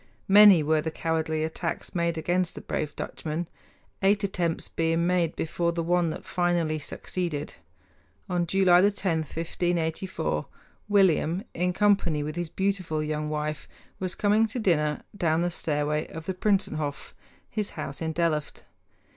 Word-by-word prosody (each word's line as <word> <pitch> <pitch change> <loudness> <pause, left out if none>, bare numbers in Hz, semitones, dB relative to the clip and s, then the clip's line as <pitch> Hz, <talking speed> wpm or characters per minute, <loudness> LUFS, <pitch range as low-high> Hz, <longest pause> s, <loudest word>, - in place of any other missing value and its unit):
Many 200 -4 +8
were 155 +1 +2
the 160 - -2
cowardly 160 -1 -1
attacks 160 +1 -4
made 170 -1 0
against 175 +2 0
the - - -7
brave 150 -2 -3
Dutchman, 160 +2 -4 0.5
eight 200 +1 +3
attempts 175 -4 -1
being 165 +1 0
made 175 -2 +1
before 170 +1 -1
the 170 0 -1
one 175 0 +2
that 155 - -6
finally 175 -3 0
succeeded. 155 0 -4 0.7
On 175 -2 0
July 185 0 +5
10, 190 -4 +1
1584, 165 +3 -2 0.4
William, 190 -2 +3
in 180 +1 0
company 185 -6 +2
with 150 +1 -4
his 175 -2 -3
beautiful 185 -5 -1
young 150 0 -2
wife, 150 0 -3 0.3
was 185 -1 -3
coming 215 +2 +3
to 235 +4 -6
dinner 150 -9 +1
down 165 -3 +1
the 175 0 0
stairway 150 -2 -1
of 160 0 -8
the 190 - -2
Prinsenhof 180 -7 -1 0.3
his 210 -2 -3
house 140 +2 -5
in 160 0 -1
Delft. 160 -2 -1
170 Hz, 145 wpm, -27 LUFS, 155-185 Hz, 0.7 s, Many